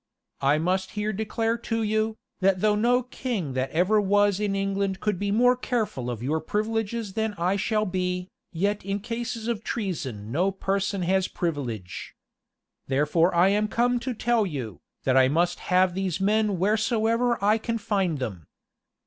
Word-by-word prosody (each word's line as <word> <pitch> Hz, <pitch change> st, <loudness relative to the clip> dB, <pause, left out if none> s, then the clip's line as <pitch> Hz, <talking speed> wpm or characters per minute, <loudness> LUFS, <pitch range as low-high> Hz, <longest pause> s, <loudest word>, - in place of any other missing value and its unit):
I 140 Hz, +2 st, +3 dB
must 185 Hz, +4 st, -1 dB
here 210 Hz, +1 st, -1 dB
declare 225 Hz, +3 st, -1 dB
to 225 Hz, 0 st, -2 dB
you, 220 Hz, +1 st, 0 dB, 0.2 s
that 190 Hz, -1 st, +2 dB
though 215 Hz, -1 st, +4 dB
no 240 Hz, +4 st, +2 dB
king 235 Hz, -, -3 dB
that 130 Hz, +1 st, -1 dB
ever 185 Hz, +6 st, +3 dB
was 205 Hz, 0 st, +3 dB
in 205 Hz, -2 st, 0 dB
England 195 Hz, -1 st, -1 dB
could 210 Hz, -4 st, -1 dB
be 205 Hz, -, -1 dB
more 245 Hz, +4 st, +4 dB
careful 220 Hz, -, -2 dB
of 120 Hz, -1 st, -4 dB
your 155 Hz, +5 st, 0 dB
privileges 215 Hz, +2 st, -2 dB
than 220 Hz, 0 st, -1 dB
I 180 Hz, +3 st, +1 dB
shall 215 Hz, +1 st, 0 dB
be, 180 Hz, -1 st, -2 dB, 0.2 s
yet 200 Hz, +4 st, -1 dB
in 200 Hz, +1 st, -2 dB
cases 230 Hz, 0 st, -4 dB
of 225 Hz, -2 st, -2 dB
treason 135 Hz, -, -4 dB
no 175 Hz, +8 st, +2 dB
person 195 Hz, 0 st, -1 dB
has 190 Hz, +1 st, +2 dB
privilege. 125 Hz, -, -4 dB, 0.7 s
Therefore 150 Hz, +6 st, +2 dB
am 195 Hz, +5 st, +4 dB
I -, -, -2 dB
come 245 Hz, +2 st, +1 dB
to 250 Hz, +1 st, -4 dB
tell 235 Hz, 0 st, +2 dB
you, 130 Hz, -, -5 dB, 0.2 s
that 130 Hz, -, +2 dB
I 130 Hz, 0 st, +6 dB
must 170 Hz, +5 st, +1 dB
have 185 Hz, 0 st, +4 dB
these 190 Hz, -2 st, -2 dB
men 210 Hz, 0 st, +2 dB
wheresoever 225 Hz, +4 st, +2 dB
I 210 Hz, +3 st, +3 dB
can 230 Hz, +1 st, -2 dB
find 195 Hz, -7 st, 0 dB
them. 100 Hz, -, -5 dB
200 Hz, 165 wpm, -26 LUFS, 175-220 Hz, 0.7 s, I